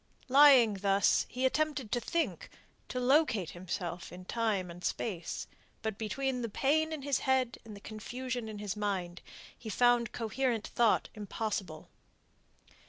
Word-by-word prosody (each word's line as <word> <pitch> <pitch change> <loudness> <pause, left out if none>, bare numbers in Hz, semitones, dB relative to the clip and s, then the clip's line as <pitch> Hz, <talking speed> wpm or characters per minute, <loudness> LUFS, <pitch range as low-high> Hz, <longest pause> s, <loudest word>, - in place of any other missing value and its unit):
Lying 260 -7 +7
thus, 195 -1 +3
he 255 +1 -1
attempted 290 -4 0
to 240 - +1
think, 330 +8 -2 0.4
to 250 - -3
locate 250 - +2
himself 175 -1 -5
in 180 +1 -10
time 205 -5 -1
and 175 +1 -11
space. 175 -7 -3 0.4
But 220 -2 -3
between 255 +3 -2
the 230 - -3
pain 315 +8 +1
in 305 -3 -5
his 280 -1 +1
head 260 -2 +1
and 220 -2 -10
the - - -10
confusion 245 +2 -5
in 215 - -7
his 205 -1 -4
mind, 190 -4 -3 0.3
he 225 - -9
found 240 +1 +3
coherent 235 0 -1
thought 235 -3 +2
impossible. 205 -5 -4
225 Hz, 145 wpm, -32 LUFS, 200-260 Hz, 0.4 s, Lying